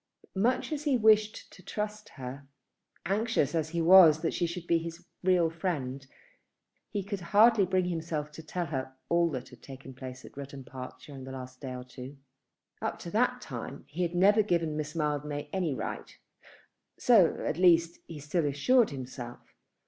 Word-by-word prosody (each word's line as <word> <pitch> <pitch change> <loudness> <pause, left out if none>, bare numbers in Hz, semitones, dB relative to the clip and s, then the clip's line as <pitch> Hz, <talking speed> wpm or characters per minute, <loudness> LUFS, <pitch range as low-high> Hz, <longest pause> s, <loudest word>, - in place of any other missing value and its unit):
Much 235 +10 +1
as 300 0 -3
he 275 -4 +3
wished 215 -1 +3
to - - -14
trust 210 +2 -5
her, 135 +1 -8 0.6
anxious 205 - +1
as 160 -2 0
he 170 0 -1
was 165 -3 +8
that 165 - -1
she 175 - 0
should 170 0 -6
be 170 -1 +2
his 165 0 -8 0.2
real 180 -2 +4
friend 145 -6 -3 0.8
he 205 -2 -3
could 200 0 -4
hardly 205 +3 +5
bring 185 0 +1
himself 160 -3 -3
to 150 - -10
tell 175 +3 -3
her 130 -4 -4
all 170 0 +3
that 130 -4 -5
had - - -16
taken 135 0 -10
place 130 0 -9
at - - -14
Rudham 140 -1 -8
Park 130 0 -9
during 135 -3 -10
the 130 - -8
last 130 -1 -9
day 130 -2 -5
or 125 - -6
two. 130 +2 -10 0.6
Up - - -2
to - - -8
that - - +1
time - - -7
he 175 +4 -1
never 185 +5 +4
had 210 - +2
given 165 -4 +1
Miss 150 +1 -4
Mildmay 150 -1 -2
any 175 -7 0
right. - - -6 0.8
So, 210 -9 +5
at 155 - -1
least, 170 -2 +4
he 165 - -8
still 150 +2 -1
assured 215 - +3
himself. 125 -3 -8
165 Hz, 180 wpm, -29 LUFS, 140-185 Hz, 0.8 s, was